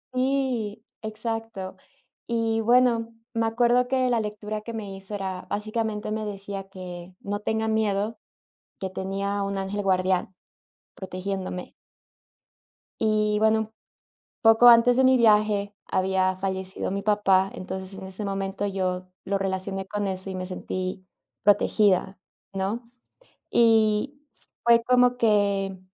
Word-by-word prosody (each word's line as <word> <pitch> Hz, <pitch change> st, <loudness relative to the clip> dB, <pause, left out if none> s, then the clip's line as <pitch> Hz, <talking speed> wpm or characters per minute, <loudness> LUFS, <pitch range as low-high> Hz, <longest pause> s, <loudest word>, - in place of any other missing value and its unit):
Sí, 255 Hz, -5 st, -1 dB, 0.2 s
exacto. 220 Hz, -3 st, -5 dB, 0.5 s
Y, 225 Hz, -1 st, 0 dB
bueno, 235 Hz, 0 st, +3 dB, 0.2 s
me 225 Hz, 0 st, +1 dB
acuerdo 240 Hz, +2 st, +3 dB
que 255 Hz, -1 st, +1 dB
la 235 Hz, -, +3 dB
lectura 210 Hz, 0 st, -4 dB
que 230 Hz, +2 st, -7 dB
me 205 Hz, -4 st, -6 dB
hizo 195 Hz, +2 st, -7 dB
era, 190 Hz, -2 st, -4 dB
básicamente, 215 Hz, 0 st, -2 dB
me 215 Hz, 0 st, -2 dB
decía 195 Hz, -1 st, -6 dB
que 180 Hz, -1 st, -9 dB
no 205 Hz, +1 st, -3 dB
tenga 220 Hz, +1 st, -1 dB
miedo, 215 Hz, 0 st, 0 dB, 0.6 s
que 190 Hz, -, -3 dB
tenía 195 Hz, +2 st, -2 dB
un 195 Hz, 0 st, -2 dB
ángel 195 Hz, +1 st, -3 dB
guardián 185 Hz, -1 st, +1 dB, 0.6 s
protegiéndome. 185 Hz, -1 st, -5 dB, 1.3 s
Y, 215 Hz, -1 st, +2 dB
bueno, 220 Hz, 0 st, +2 dB, 0.7 s
poco 225 Hz, +2 st, +7 dB
antes 240 Hz, +1 st, +7 dB
de 260 Hz, -, +4 dB
mi 260 Hz, 0 st, +6 dB
viaje, 210 Hz, -3 st, +3 dB
había 185 Hz, 0 st, +1 dB
fallecido 190 Hz, 0 st, -3 dB
mi 200 Hz, +1 st, -2 dB
papá, 195 Hz, -2 st, +3 dB
entonces, 190 Hz, +1 st, -6 dB
en 190 Hz, -, -7 dB
ese 190 Hz, +2 st, -5 dB
momento, 195 Hz, 0 st, -2 dB
yo 185 Hz, -2 st, -2 dB, 0.2 s
lo 200 Hz, 0 st, 0 dB
relacioné 195 Hz, 0 st, -3 dB
con 205 Hz, 0 st, -2 dB
eso 190 Hz, 0 st, -4 dB
y -, -, -5 dB
me 185 Hz, 0 st, -4 dB
sentí 185 Hz, 0 st, -4 dB, 0.4 s
protegida, 200 Hz, -2 st, +3 dB, 0.3 s
¿no? 205 Hz, +5 st, -3 dB, 0.6 s
Y 225 Hz, +4 st, +3 dB, 0.4 s
fue 235 Hz, 0 st, +6 dB
como 250 Hz, 0 st, +4 dB
que 200 Hz, -4 st, +2 dB
205 Hz, 125 wpm, -25 LUFS, 190-225 Hz, 1.3 s, poco